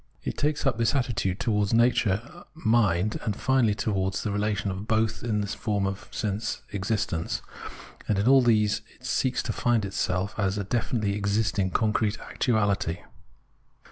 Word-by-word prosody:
It - - -3
takes 150 0 0
up 125 -4 +1
this 115 +3 +2
attitude 120 -8 0
towards 105 -2 +1
Nature, 120 - +1
Mind, 110 - +2
and 105 -3 -1
finally 125 -5 +2
towards 95 -3 -1
the 105 - -1
relation 105 0 -1
of 95 +3 -6
both 110 -1 +1
in 110 -3 0
the - - -1
form 100 -1 -1
of 95 0 -4
sense 105 +2 -3
existence; 100 -4 -2 0.6
and 105 - +1
in 100 +4 +1
all 135 0 +7
these 110 -4 +3
it - - -16
seeks 130 -2 0
to - - -2
find 120 -4 +1
itself 95 0 -1
as 95 0 +1
a 100 - -1
definitely 110 0 -1
existing 100 -1 0
concrete 110 +1 +1
actuality. 100 -7 0
105 Hz, 155 wpm, -27 LUFS, 100-115 Hz, 0.6 s, all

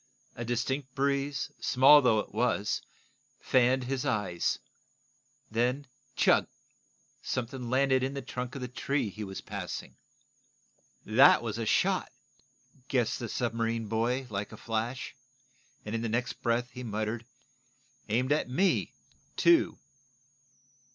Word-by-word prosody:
A 120 - -5
distinct 130 +3 -2
breeze, 140 0 0
small 135 +3 +7
though 125 -5 +4
it - - -12
was, 120 -4 0 0.6
fanned 130 0 +3
his 130 +1 -2
eyes. 95 -5 0 0.9
Then 125 +5 0 0.3
chug! - - +4 0.7
Something 125 0 -4
landed 130 0 +3
in 135 +2 -2
the 140 - -4
trunk 125 0 -5
of 140 - -5
the 125 - -3
tree 135 -1 -1
he 110 +2 -7
was 95 -1 -6
passing. - - -6 1.1
"That - - +6
was - - -3
a - - -2
shot!" - - +2 0.8
guessed 120 -3 0
the 120 - -5
submarine 115 -1 -1
boy, 120 +5 0
like 100 0 -3
a - - -10
flash, 115 +4 -3 0.7
and 105 - -5
in 115 - -1
the 115 - -2
next 120 +3 -2
breath 120 +1 0
he 125 - -8
muttered: 110 +1 -3 0.9
"Aimed 125 +5 +1
at 150 -4 +1
me, 185 +9 +1 0.4
too!" 340 -1 +4
125 Hz, 130 wpm, -30 LUFS, 115-130 Hz, 1.1 s, small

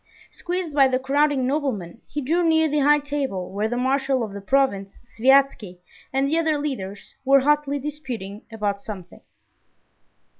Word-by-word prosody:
Squeezed 355 -3 -4
by 275 -2 +5
the 255 -1 +1
crowding 275 0 +1
noblemen, 250 - -2
he 295 - -4
drew 330 +6 +1
near 320 -1 +3
the 300 0 0
high 295 +1 +5
table 280 -11 -3
where 205 +3 -1
the 245 +2 -3
marshal 265 0 +1
of 210 -3 -6
the 200 - -7
province, 200 -5 0
Sviazhsky, 250 -6 +2 0.3
and 270 +1 +1
the 320 +4 +1
other 315 -2 +1
leaders 205 -10 -5
were 275 0 +5
hotly 295 0 +1
disputing 255 -9 -6
about 205 -2 -2
something. 190 -4 -9
270 Hz, 155 wpm, -23 LUFS, 215-290 Hz, 0.3 s, by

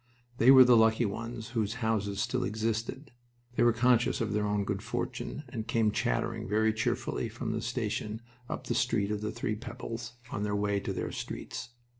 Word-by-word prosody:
They 120 - +6
were 130 -1 +11
the 125 -1 +6
lucky 110 +1 +4
ones 115 +3 -5
whose 115 -3 -1
houses 110 -4 -1
still 125 +4 0
existed. 115 +5 -2 0.4
They - - +1
were 120 - +6
conscious 120 +1 +3
of 110 -2 -1
their 105 0 +1
own 105 0 +1
good 100 -1 -2
fortune 150 - -4
and 110 -2 -5
came 115 -2 +2
chattering - - -1
very 110 +1 +3
cheerfully 110 - -1
from - - -4
the - - -2
station 105 +1 -2 0.3
up - - -4
the - - -1
Street 115 -4 +1
of 105 -1 -2
the 105 0 -2
Three 110 - -2
Pebbles, 115 +1 -6 0.2
on 100 - -3
their 105 0 0
way 100 0 +1
to 100 - -4
their - - -3
streets. - - -6
110 Hz, 190 wpm, -30 LUFS, 105-120 Hz, 0.4 s, were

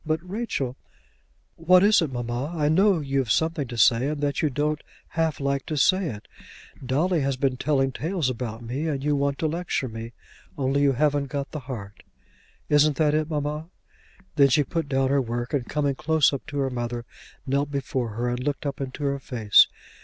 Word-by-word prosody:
But, 160 +3 -2
Rachel 180 - -3 0.4
" - - -41
"What 185 0 +8
is 210 -1 +5
it, 155 -5 -1
mamma? 120 +4 -3
I 150 -1 +2
know 190 +4 +4
you've 135 -3 -1
something 160 +3 +1
to 120 0 -7
say, 115 +4 +4
and 150 0 -2
that 145 -1 0
you 155 - +2
don't 150 +2 -1 0.3
half 160 -3 -1
like 140 -1 -1
to 155 - -2
say 185 +5 +3
it. 105 -7 -7 0.6
Dolly 155 +7 +1
has 135 -1 -1
been 130 -1 +1
telling 135 0 +1
tales 165 +2 -2
about 120 -2 -4
me, 130 +7 -3
and 140 -3 -2
you 145 0 +2
want 140 0 0
to 160 - 0
lecture 165 -4 -2
me, 115 0 -7 0.4
only 135 0 +1
you 140 -1 +4
haven't 145 +1 +1
got 140 0 -4
the 155 - -4
heart. 100 -6 -7 0.7
Isn't 150 0 +4
that 150 -2 +3
it, 155 0 0
mamma?" 150 +1 -3 0.7
Then 140 -1 +7
she 145 +3 +4
put 165 +1 -3
down 135 -1 +1
her 140 0 +3
work, 120 +1 -4
and 135 -4 -1
coming 145 -2 0
close 155 +1 +2
up 140 - -5
to 145 -1 -5
her 135 -1 0
mother, 120 -1 -4 0.4
knelt 140 +1 0
before 130 -4 -2
her 120 +2 -1
and 125 +1 -2
looked 145 +1 -2
up 140 0 -3
into 135 +2 -5
her 140 0 0
face. 115 -6 +4
140 Hz, 200 wpm, -25 LUFS, 130-155 Hz, 0.7 s, What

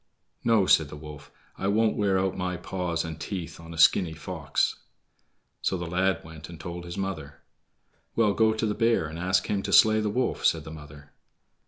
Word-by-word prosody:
"No," 110 -4 +4
said 80 -5 +4
the - - -8
wolf, 75 -1 -10 0.3
"I 95 - -1
won't 110 +2 +2
wear 100 -2 +2
out 95 0 0
my 90 -1 -2
paws 85 -2 -3
and 80 -1 -6
teeth 90 -6 -5
on 85 0 -11
a 80 - -8
skinny 80 +1 +5
fox." 80 - -1 0.8
So 95 - 0
the 85 - -4
lad 90 +1 0
went 80 0 -11
and 85 -2 -10
told 85 +1 -6
his 85 +2 -7
mother. 80 -9 -5 0.7
"Well, 110 -3 +3
go 110 +1 +3
to 110 +1 -1
the 105 - 0
bear 115 -6 +2
and 80 +2 -7
ask 95 +2 +1
him 100 -1 -1
to - - -4
slay 110 0 +6
the 105 -1 0
wolf," 125 +4 -1
said 80 -2 +2
the 80 - -9
mother. 75 -2 -12
90 Hz, 200 wpm, -27 LUFS, 80-100 Hz, 0.8 s, slay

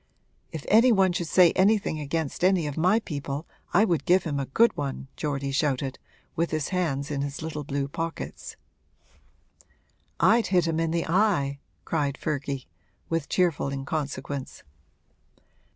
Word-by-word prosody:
'If 160 -3 -6
any 230 +4 +6
one 190 -4 +4
should 175 -1 -2
say 175 +1 +6
anything 195 -4 +2
against 150 +2 -3
any 185 -3 +3
of 145 -2 -4
my 185 +7 +3
people 145 -3 -5 0.3
I 200 +5 +5
would 170 -6 0
give 180 +1 +4
him 145 -3 -2
a 135 - -3
good 230 - +3
one!' 140 -2 -4
Geordie 140 -2 -2
shouted, 135 -2 -1 0.4
with 170 +1 0
his 155 -2 -2
hands 150 -6 -1
in 140 -1 -1
his 140 +2 -4
little 150 -2 -4
blue 140 -1 -2
pockets. 165 +3 -5 1.6
'I'd 230 0 +4
hit 180 -3 +3
him 165 -1 0
in 165 0 +1
the 165 0 -1
eye!' 165 -7 +1 0.3
cried 145 -4 -1
Ferdy, 140 -3 -3 0.4
with 165 -3 -1
cheerful 175 -6 +1
inconsequence. 140 -1 -4
155 Hz, 150 wpm, -26 LUFS, 140-180 Hz, 1.6 s, any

